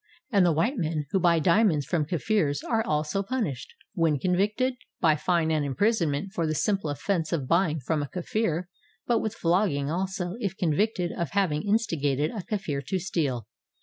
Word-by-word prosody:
And 200 -4 +4
the 175 - +4
white 215 - +1
men 155 -3 -1
who 190 - +2
buy 170 -2 +4
diamonds 170 -2 +3
from 160 -4 0
Kafirs 160 -4 0
are 225 -1 0
also 150 +4 0
punished, 200 - -3 0.2
when 165 -6 +2
convicted, 205 - +1 0.3
by 160 -3 +4
fine 160 +1 +1
and 155 -2 +1
imprisonment 170 - 0
for 165 -2 0
the 155 - -1
simple 195 -2 0
offense 165 +3 -1
of 145 -7 -1
buy 170 +3 +3
ing 155 -1 -3
from 150 +4 -1
a 145 - -3
Kafir, 180 0 -2 0.4
but 235 -2 +2
with 220 0 -3
flogging 165 -6 +1
also 185 +2 -2
if 200 -5 -3
convicted 180 +2 +1
of 170 -4 -2
having 180 -7 +1
instigated 160 - 0
a 215 - -4
Kafir 180 -9 -3
to 185 +7 -2
steal. 150 - -2
170 Hz, 180 wpm, -27 LUFS, 150-200 Hz, 0.4 s, And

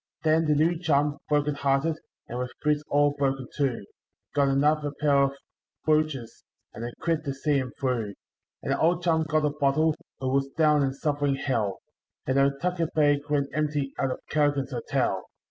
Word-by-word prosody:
Then 160 +1 +3
the 150 -1 +3
new 160 +3 +2
chum, 145 -3 +1
broken 150 0 +2
hearted, 140 +3 0 0.3
and 120 - -5
with 125 0 -2
boots 150 -1 +2
all 145 0 +3
broken 135 -2 0
too, 130 -8 -1 0.5
Got 140 -1 +3
another 145 +2 +2
pair 140 -2 +4
of 135 - -2 0.5
bluchers, 155 -6 0 0.3
and 115 - -7
a 120 - -4
quid 165 -2 0
to 140 -1 -2
see 145 +1 +1
him 130 -2 -4
through; 115 -6 -1 0.5
And - - -2
the - - -2
old 175 +2 +2
chum 160 -2 +2
got 155 0 +2
a 150 - +1
bottle, 150 +2 +2 0.2
who 130 - -2
was 135 0 +2
down 150 -2 +4
and 135 -1 0
suffering 145 -1 0
Hell;— 115 -8 -1 0.5
And 130 - +1
no 135 0 +5
tucker 170 +4 -1
bag 145 -2 +4
went 140 -1 +1
empty 145 -2 -1
out 135 - +1
of 130 - -3
Callaghan's 145 -3 +1
Hotel. 120 -3 -1
145 Hz, 180 wpm, -27 LUFS, 135-155 Hz, 0.5 s, no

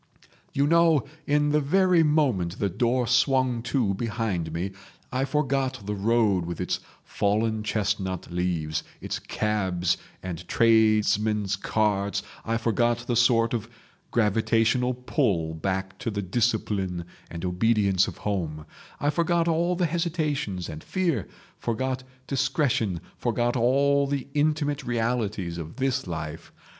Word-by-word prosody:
"You 140 - +2
know, 165 -1 +4 0.2
in 150 0 +3
the 150 +1 +3
very 180 +3 +4
moment 130 - +2
the 100 - 0
door 120 +6 +1
swung 125 0 +2
to 115 -8 +1
behind 105 -6 -2
me, 90 +4 -3 0.4
I 130 +2 0
forgot 135 -4 -1
the 105 - -2
road 105 -2 +2
with 85 0 -5
its - - -1 0.2
fallen 110 +2 0
chestnut 100 -4 -2
leaves, 85 -3 -1 0.2
its - - -4
cabs 95 -5 0 0.3
and 90 -3 -6
tradesmen's 110 -2 +3
carts, 100 -1 0 0.2
I 115 0 0
forgot 120 +1 +1
the 120 - 0
sort 115 -1 +4
of 115 -1 -3 0.4
gravitational 115 +3 +2
pull 105 - 0
back 95 +3 -3
to - - -2
the 100 -2 -3
discipline 95 -4 0 0.2
and 85 +1 -5
obedience 100 0 +2
of - - -7
home, 80 -7 -2 0.3
I 145 +1 +1
forgot 170 +1 +1
all 170 +2 +1
hesitations 155 - -1
and 75 0 -8
fear, 170 - -1 0.3
forgot 130 +3 -2 0.2
discretion, 135 - 0 0.2
forgot 120 +1 0
all 140 +3 +3
the 140 -1 -2
intimate 145 -1 +1
realities 110 -7 -1
of 80 -1 -7
this 135 -3 -1
life. 80 -1 -6
115 Hz, 130 wpm, -26 LUFS, 95-135 Hz, 0.4 s, know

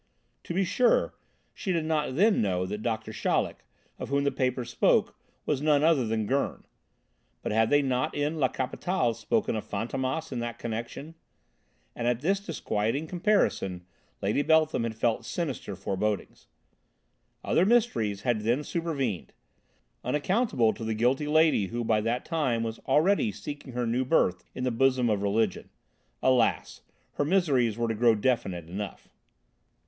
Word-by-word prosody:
To 170 - -4
be 195 - +3
sure 230 +6 +2 0.4
she 190 - -3
did 165 -3 0
not 150 -4 -1
then 205 +7 +4
know 90 -3 0
that 105 +3 -5
Doctor 110 -1 -3
Chaleck, - - -1 0.4
of - - -5
whom 140 0 +1
the 140 - +1
papers 125 -2 -1
spoke, - - +2 0.3
was 145 -2 0
none 150 -1 +3
other 155 -7 +3
than 110 -1 -1
Gurn, 135 +6 -1 0.8
but - - -2
had 110 +1 +3
they 145 0 +4
not 130 -1 -1
in 150 +2 -1
La 130 - +4
Capitale 130 +2 -1
spoken 115 - -1
of 110 - -3
Fantômas 130 +8 -2
in 125 - -3
that 120 0 -4
connection? 120 +7 -5 0.8
And 120 - -2
at 120 0 +1
this 195 +6 +1
disquieting 140 - -2
comparison 170 - 0 0.4
Lady 105 +8 +1
Beltham 155 -5 +3
had 115 -1 -4
felt 115 +1 0
sinister 140 - -4
forebodings. 100 +2 -3 1.0
Other 170 - +2
mysteries 190 - +2
had 120 -1 +1
then 120 +7 +1
supervened, 140 - -3 0.7
unaccountable 150 - +1
to - - -8
the 110 0 -1
guilty 125 +6 +1
lady 155 -9 +3
who 120 +3 -3
by 110 -1 +2
that 115 +3 -1
time 135 -9 0
was 115 0 -4
already 150 - +3
seeking 130 +6 -8
her 125 0 -1
new 120 +3 0
birth 125 - +2
in 125 - -4
the 125 - +1
bosom 125 -1 +2
of 100 -2 0
Religion. 100 0 0 0.5
Alas! 130 -3 +2 0.4
her - - +2
miseries 140 - +2
were 120 0 0
to 115 - 0
grow 115 +1 +4
definite 100 -8 -1
enough. 100 +3 -6
125 Hz, 155 wpm, -28 LUFS, 110-155 Hz, 1.0 s, then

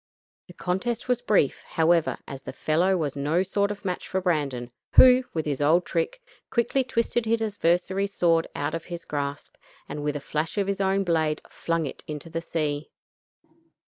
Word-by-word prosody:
The 180 - -12
contest 205 +9 -2
was 250 -1 +1
brief, 210 - +2
however, 165 0 +2
as 135 -1 -7
the - - -7
fellow 180 +5 +2
was 150 -5 -2
no 150 +6 +1
sort 200 +1 0
of 205 -1 -6
match 180 -2 -3
for 190 - -1
Brandon, 140 -9 -1 0.2
who, 255 0 +8
with 160 - -1
his 145 -2 -2
old 160 +5 +4
trick, - - -1 0.3
quickly 240 +3 +1
twisted 235 -2 0
his 230 +1 +2
adversary's 195 -1 +1
sword 165 -2 +3
out 145 +2 -2
of 165 -1 -4
his 170 -1 -7
grasp, 145 -2 -4 0.3
and 150 - -5
with 150 0 -1
a - - -2
flash 155 +4 -3
of 200 - +2
his 200 0 -1
own 195 0 +2
blade 160 -3 0
flung 165 -1 -1
it 135 - -7
into 150 +2 -6
the 165 0 -2
sea. 155 -3 -2
170 Hz, 180 wpm, -26 LUFS, 150-200 Hz, 0.3 s, who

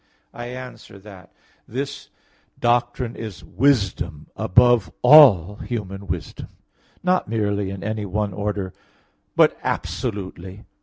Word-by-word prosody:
I 120 0 -7
answer 125 -5 -9
that, 95 -2 -14 0.4
This 135 +4 -5 0.5
doctrine 120 0 0
is 110 -6 -8
wisdom 100 - 0
above 120 -3 +3
all 105 - +7
human 100 -4 -6
wisdom; 85 -3 -5 0.6
not 185 0 +1
merely 105 -3 -1
in 95 -1 -7
any 110 -1 -3
one 100 +1 -2
order, 100 -2 -3 0.6
but - - +5
absolutely. 95 0 -4
105 Hz, 105 wpm, -22 LUFS, 95-120 Hz, 0.6 s, all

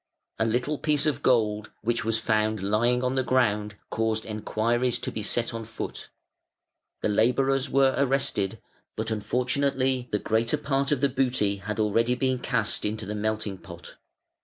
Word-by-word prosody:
A 110 - +3
little 125 +6 0
piece 150 -1 +1
of 145 -3 0
gold 105 -5 +2
which 120 +2 0
was 115 0 +1
found 110 -1 +1
lying 120 +5 +2
on 125 0 +1
the 135 - +2
ground 105 -5 +1 0.2
caused 110 0 0
enquiries 115 +3 0
to - - -4
be 110 - -4
set 115 +3 -1
on 115 0 -4
foot; 110 0 -6 0.9
the - - +3
labourers 125 +5 +2
were 135 -1 +4
arrested, 135 -7 0 0.4
but - - -3
unfortunately 130 +3 0
the 105 - +2
greater 115 +6 +1
part 140 -1 0
of 140 -4 +1
the 140 - +5
booty 125 -6 +1
had 105 +3 -5
already 115 +3 +2
been 130 0 0
cast 120 -4 0
into 105 0 -2
the 105 - -4
melting 105 -2 -2
pot. 85 -2 -11
115 Hz, 160 wpm, -27 LUFS, 110-130 Hz, 0.9 s, the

